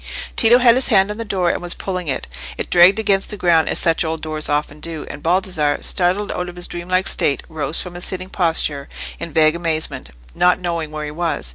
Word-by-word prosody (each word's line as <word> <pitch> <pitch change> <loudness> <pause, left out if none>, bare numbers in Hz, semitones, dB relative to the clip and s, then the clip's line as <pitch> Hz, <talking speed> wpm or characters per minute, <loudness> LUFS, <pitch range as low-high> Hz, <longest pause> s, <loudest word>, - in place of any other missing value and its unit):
Tito 235 0 +6
had 245 -2 +6
his 255 +2 +2
hand 195 -4 +3
on 210 - -6
the 230 - -4
door 185 -5 0
and - - -4
was 175 0 0
pulling 185 -3 -4
it: 135 - -2 0.3
it - - -5
dragged 180 +3 +6
against 200 -3 +1
the 210 - -6
ground 170 -3 +3
as - - 0
such 165 0 +2
old 160 -1 -4
doors 155 -1 -4
often 150 0 -1
do, 160 0 -6
and 145 - -9
Baldassarre, 165 -3 +1
startled 185 +3 0
out 180 0 -3
of 175 - -11
his 175 0 -6
dreamlike 185 +2 -1
state, 140 - 0
rose 155 -1 -2
from 180 - -9
his 175 0 -4
sitting 185 0 -3
posture 160 -5 0 0.3
in 170 - -6
vague 155 +1 +3
amazement, 165 -2 -3 0.2
not 180 - +3
knowing 170 -3 -3
where 155 0 -5
he 150 - -6
was. 165 - -3
175 Hz, 225 wpm, -19 LUFS, 155-185 Hz, 0.3 s, Tito